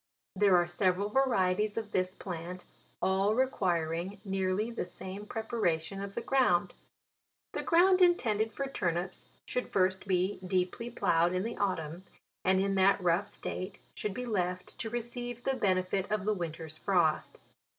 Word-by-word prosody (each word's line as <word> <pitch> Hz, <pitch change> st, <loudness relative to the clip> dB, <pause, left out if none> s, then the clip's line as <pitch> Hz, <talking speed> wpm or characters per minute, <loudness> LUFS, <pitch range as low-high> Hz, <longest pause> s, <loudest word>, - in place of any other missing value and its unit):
There 195 Hz, -1 st, +5 dB
are 175 Hz, -, +3 dB
several 185 Hz, +3 st, +1 dB
varieties 210 Hz, -5 st, +2 dB
of 215 Hz, -2 st, -3 dB
this 185 Hz, 0 st, 0 dB
plant 180 Hz, 0 st, -6 dB, 0.4 s
all 195 Hz, +3 st, +2 dB
requiring 185 Hz, -6 st, 0 dB
nearly 195 Hz, +3 st, 0 dB
the 230 Hz, -, -2 dB
same 190 Hz, +3 st, -8 dB
preparation 195 Hz, -6 st, -1 dB
of 200 Hz, 0 st, -6 dB
the 235 Hz, -, -3 dB
ground. 255 Hz, -10 st, +3 dB, 0.8 s
The -, -, -2 dB
ground 365 Hz, +2 st, +5 dB
intended 225 Hz, -, +3 dB
for 275 Hz, +6 st, -3 dB
tur 270 Hz, -10 st, -1 dB
nips 175 Hz, +2 st, -5 dB, 0.2 s
should 250 Hz, -, -2 dB
first 190 Hz, 0 st, +1 dB
be 185 Hz, +1 st, +1 dB
deeply 185 Hz, +5 st, -1 dB
ploughed 170 Hz, -6 st, +2 dB
in 185 Hz, -, 0 dB
the 230 Hz, +2 st, -4 dB
autumn, 175 Hz, -3 st, -2 dB, 0.4 s
and 190 Hz, 0 st, +4 dB
in 195 Hz, +1 st, +1 dB
that 195 Hz, +1 st, +4 dB
rough 180 Hz, +2 st, +2 dB
state 185 Hz, +2 st, -5 dB, 0.2 s
should 210 Hz, -2 st, -3 dB
be 250 Hz, -, -3 dB
left 180 Hz, -5 st, -2 dB
to 225 Hz, -, -3 dB
receive 240 Hz, +1 st, -5 dB
the 270 Hz, -, +1 dB
benefit 190 Hz, -3 st, 0 dB
of 210 Hz, -2 st, 0 dB
the 215 Hz, -, +2 dB
winter's 165 Hz, -4 st, -5 dB
frost. 175 Hz, -6 st, +1 dB
195 Hz, 155 wpm, -31 LUFS, 180-220 Hz, 0.8 s, There